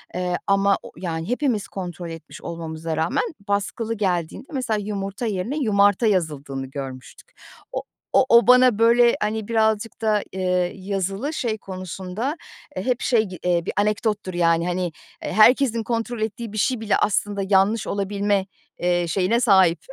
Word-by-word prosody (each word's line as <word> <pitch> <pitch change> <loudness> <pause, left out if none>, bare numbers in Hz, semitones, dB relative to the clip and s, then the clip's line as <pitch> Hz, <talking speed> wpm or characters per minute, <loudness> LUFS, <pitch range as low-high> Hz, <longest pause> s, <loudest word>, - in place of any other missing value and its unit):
Eee, 180 -1 -1
ama 200 0 +3
o - - -10
yani, 165 0 -4
hepimiz 250 -5 0
kontrol 175 -2 -6
etmiş 165 0 -10
olmamıza 165 -1 -5
rağmen, 160 +1 +1 0.2
baskılı 205 +3 -1
geldiğinde, 185 +1 -2
mesela, 240 -5 -1
yumurta 200 +2 -4
yerine 215 +6 -2
yumarta 205 -4 +3
yazıldığını 145 -8 -1
görmüştük. 130 -2 -9 0.4
O - - -3 0.3
o - - +5
o 235 0 +6
bana, 250 -3 +6
böyle, 235 +1 +5
hani, 215 0 -1
birazcık 220 -1 0
da, 215 -2 +2
eee, 180 -1 0
yazılı 195 - -3
şey 230 -6 -2
konusunda, 190 - -5 0.4
eee, 185 - -3
hep 250 -1 0
şey 230 -4 +3
gi 185 -4 -8
eee, 175 -1 +1
bir - - -3
anekdottur, 210 -2 0
yani. 170 0 +2
Hani, 180 +1 -1 0.4
eee, - - -3
herkesin 230 +1 +5
kontrol 230 0 -3
ettiği 220 +1 -3
bir - - -5
şey 250 +3 +1
bile 210 -2 +2
aslında 205 0 0
yanlış 200 +3 +3
olabilme, 200 0 0 0.3
eee, 175 -1 +1
şeyine 190 +7 +1
sahip. 190 -8 +4
200 Hz, 155 wpm, -23 LUFS, 180-225 Hz, 0.4 s, o